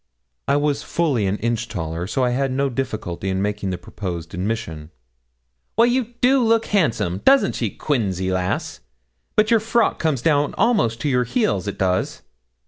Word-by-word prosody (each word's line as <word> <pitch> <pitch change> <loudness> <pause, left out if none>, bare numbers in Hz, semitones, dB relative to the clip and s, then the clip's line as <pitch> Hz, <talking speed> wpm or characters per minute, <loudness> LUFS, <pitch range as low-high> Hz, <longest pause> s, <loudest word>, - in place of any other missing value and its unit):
I 140 - +3
was 145 -1 +1
fully 140 -12 0
an 95 +2 0
inch 115 +1 -1
taller, 80 +1 -4
so 130 +5 0
I 125 - +2
had 135 +1 0
no 135 +1 0
difficulty 110 -8 -3
in 95 0 -1
making 100 0 -2
the 90 - -2
proposed 85 -2 -6
admission. 90 -5 -4 0.9
'Well, 230 - +6
you 240 -1 0
do 260 +1 +4
look 225 0 +3
handsome! 115 - +1
doesn't 265 - +4
she, 115 - -1
Quinzy, 95 - -1
lass? 90 0 -2 0.6
but 215 +1 +3
your 230 - +6
frock 225 +1 +1
comes 150 -7 0
down 145 -2 +2
almost 160 - +2
to - - -1
your 125 -3 +2
heels 215 - 0
it 100 - -4
does.' 95 -1 -1
120 Hz, 170 wpm, -21 LUFS, -, 0.9 s, Well